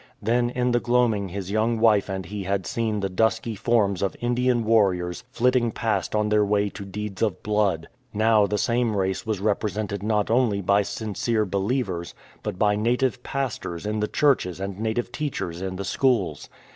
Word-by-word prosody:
Then 120 Hz, +3 st, +1 dB
in 125 Hz, 0 st, 0 dB
the 120 Hz, -, +3 dB
gloaming 120 Hz, -5 st, +1 dB
his 95 Hz, +1 st, -5 dB
young 110 Hz, +2 st, +1 dB
wife 105 Hz, -3 st, +4 dB
and 95 Hz, -1 st, -3 dB
he 105 Hz, +3 st, -5 dB
had 95 Hz, -1 st, -1 dB
seen 110 Hz, -3 st, -1 dB
the 100 Hz, -, 0 dB
dusky 110 Hz, +4 st, 0 dB
forms 100 Hz, -3 st, +1 dB
of 100 Hz, -, -1 dB
Indian 120 Hz, 0 st, +1 dB
warriors 95 Hz, -6 st, +2 dB
flitting 125 Hz, -1 st, +2 dB
past 105 Hz, -4 st, -1 dB
on 105 Hz, 0 st, +1 dB
their 105 Hz, 0 st, +4 dB
way 100 Hz, 0 st, +1 dB
to 100 Hz, -, -8 dB
deeds 100 Hz, 0 st, -6 dB
of 105 Hz, -5 st, 0 dB
blood. 105 Hz, -6 st, +1 dB, 0.2 s
Now 110 Hz, -1 st, +3 dB
the 105 Hz, +1 st, -1 dB
same 115 Hz, +1 st, +1 dB
race 95 Hz, +2 st, -1 dB
was 110 Hz, -3 st, -1 dB
represented 105 Hz, 0 st, -1 dB
not 105 Hz, 0 st, 0 dB
only 115 Hz, -4 st, +2 dB
by 100 Hz, +1 st, +3 dB
sincere 110 Hz, +2 st, -1 dB
believers, 95 Hz, -2 st, -2 dB, 0.3 s
but -, -, -4 dB
by 105 Hz, +1 st, +3 dB
native 125 Hz, +4 st, 0 dB
pastors 125 Hz, -11 st, -4 dB
in 105 Hz, +1 st, -1 dB
the 105 Hz, -, 0 dB
churches 125 Hz, -, +1 dB
and 100 Hz, 0 st, -5 dB
native 110 Hz, +2 st, -2 dB
teachers 110 Hz, -, -4 dB
in 95 Hz, -1 st, -3 dB
the 100 Hz, +1 st, -4 dB
schools. 100 Hz, -, 0 dB
105 Hz, 180 wpm, -24 LUFS, 100-115 Hz, 0.3 s, wife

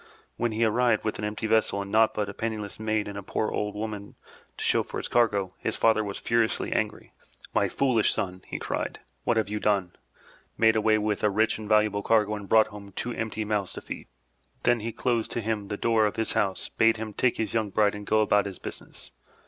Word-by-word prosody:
When 120 Hz, -1 st, 0 dB
he 110 Hz, +1 st, +1 dB
arrived 115 Hz, 0 st, +2 dB
with 110 Hz, -, -2 dB
an 105 Hz, -, -2 dB
empty 105 Hz, +1 st, -3 dB
vessel 110 Hz, -2 st, +2 dB
and 100 Hz, 0 st, -5 dB
naught 110 Hz, +1 st, +4 dB
but 105 Hz, -1 st, -1 dB
a 100 Hz, -, -6 dB
penniless 110 Hz, -2 st, -4 dB
maid 110 Hz, -1 st, 0 dB
and 100 Hz, -, -6 dB
a -, -, -6 dB
poor 105 Hz, +2 st, -2 dB
old 105 Hz, 0 st, -2 dB
woman 105 Hz, -1 st, -5 dB, 0.4 s
to -, -, -4 dB
show -, -, +4 dB
for -, -, -6 dB
his -, -, -3 dB
cargo, 105 Hz, -6 st, +2 dB
his -, -, -2 dB
father 110 Hz, -1 st, +3 dB
was 100 Hz, -1 st, -4 dB
furiously 115 Hz, -1 st, 0 dB
angry. -, -, -2 dB, 0.4 s
"My -, -, +2 dB
foolish 125 Hz, -6 st, +2 dB
son!*' 95 Hz, -4 st, -3 dB
he -, -, -4 dB
cried. -, -, -3 dB, 0.2 s
"What 120 Hz, -, +2 dB
have 110 Hz, -, +2 dB
you 105 Hz, +1 st, -3 dB
done? 100 Hz, -4 st, +1 dB, 0.7 s
Made 110 Hz, -1 st, +5 dB
away 110 Hz, 0 st, +3 dB
with 105 Hz, -1 st, -1 dB
a 105 Hz, -, +5 dB
rich 110 Hz, +2 st, +1 dB
and 105 Hz, -1 st, -7 dB
valuable 105 Hz, -1 st, +3 dB
cargo 105 Hz, -1 st, +2 dB
and 105 Hz, -2 st, -6 dB
brought 110 Hz, -1 st, +5 dB
home 100 Hz, -1 st, -10 dB
two 120 Hz, +5 st, -3 dB
empty 110 Hz, -1 st, -3 dB
mouths 105 Hz, -3 st, -1 dB
to -, -, -7 dB
feed! -, -, -7 dB, 0.6 s
Then 120 Hz, -1 st, +3 dB
he 115 Hz, +2 st, -3 dB
closed 120 Hz, 0 st, 0 dB
to -, -, -1 dB
him 110 Hz, -2 st, -2 dB
the 105 Hz, 0 st, -4 dB
door 110 Hz, -1 st, +3 dB
of 105 Hz, -, -4 dB
his' 110 Hz, -, 0 dB
house, 95 Hz, -2 st, 0 dB
bade 115 Hz, 0 st, +3 dB
him 110 Hz, -1 st, -5 dB
take 125 Hz, +3 st, +1 dB
his 110 Hz, -3 st, -2 dB
young 110 Hz, -2 st, 0 dB
bride 105 Hz, +1 st, +2 dB
and 105 Hz, 0 st, -8 dB
go 110 Hz, 0 st, +4 dB
about 105 Hz, -1 st, +3 dB
his 95 Hz, -3 st, -7 dB
business. -, -, -7 dB
110 Hz, 230 wpm, -27 LUFS, 105-110 Hz, 0.7 s, Made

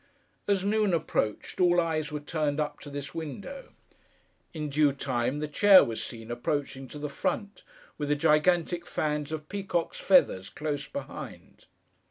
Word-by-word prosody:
As 200 Hz, -2 st, +2 dB
noon 210 Hz, -3 st, +2 dB
approached, 130 Hz, -, -2 dB
all 175 Hz, 0 st, +5 dB
eyes 160 Hz, -3 st, 0 dB
were 150 Hz, -, -3 dB
turned 150 Hz, -1 st, -1 dB
up 150 Hz, -1 st, -2 dB
to 145 Hz, -, -10 dB
this 140 Hz, 0 st, -6 dB
window. 180 Hz, -, -7 dB, 0.8 s
In 155 Hz, -2 st, -4 dB
due 145 Hz, 0 st, +3 dB
time, 130 Hz, +1 st, -1 dB
the 150 Hz, -, -1 dB
chair 195 Hz, +6 st, +7 dB
was 115 Hz, -1 st, -3 dB
seen 115 Hz, 0 st, -7 dB
approaching 135 Hz, +2 st, -2 dB
to 150 Hz, -, -9 dB
the 150 Hz, 0 st, -3 dB
front, 200 Hz, +8 st, -3 dB, 0.4 s
with 145 Hz, -1 st, -2 dB
the 150 Hz, -, +3 dB
gigantic 165 Hz, +3 st, +2 dB
fans 150 Hz, -1 st, -1 dB
of 155 Hz, -1 st, -5 dB
peacock's 190 Hz, -4 st, -2 dB
feathers, 95 Hz, -, +4 dB
close 145 Hz, -1 st, -3 dB
behind. 280 Hz, -, -8 dB
150 Hz, 155 wpm, -28 LUFS, 145-175 Hz, 0.8 s, chair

